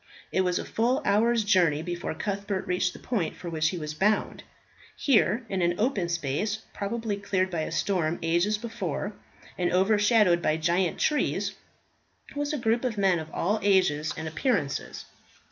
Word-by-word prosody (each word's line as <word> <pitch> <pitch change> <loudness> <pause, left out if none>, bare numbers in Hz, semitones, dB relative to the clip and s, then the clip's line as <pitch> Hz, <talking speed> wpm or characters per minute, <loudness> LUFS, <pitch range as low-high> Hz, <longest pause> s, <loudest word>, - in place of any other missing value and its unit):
It 190 - +2
was 180 -1 +1
a - - -3
full 245 +4 0
hour's 225 +3 +3
journey 175 -7 +3
before 175 -1 -4
Cuthbert 200 0 -3
reached 180 0 0
the - - -10
point 215 -10 -2
for 175 - -7
which 160 -1 +1
he 180 - -4
was 150 -2 -5
bound. 210 +7 0 0.5
Here, 235 -3 +2
in 190 -3 -2
an 175 0 +2
open 210 -7 0
space, 170 +7 -2
probably 215 0 -3
cleared 190 -2 -1
by 170 - -2
a - - -3
storm 175 -4 0
ages 175 +6 +2
before, 210 -4 -4 0.5
and 175 -1 +1
overshadowed 205 -1 +4
by 155 -1 +1
giant 170 +2 +1
trees, 300 -1 0 0.8
was 290 0 -1
a 300 - -1
group 235 -1 +1
of 240 -4 -2
men 190 -4 +3
of 160 0 -7
all 205 +6 0
ages 180 -7 +2
and 160 - -4
appearances. 160 - -2
190 Hz, 165 wpm, -27 LUFS, 170-215 Hz, 0.8 s, overshadowed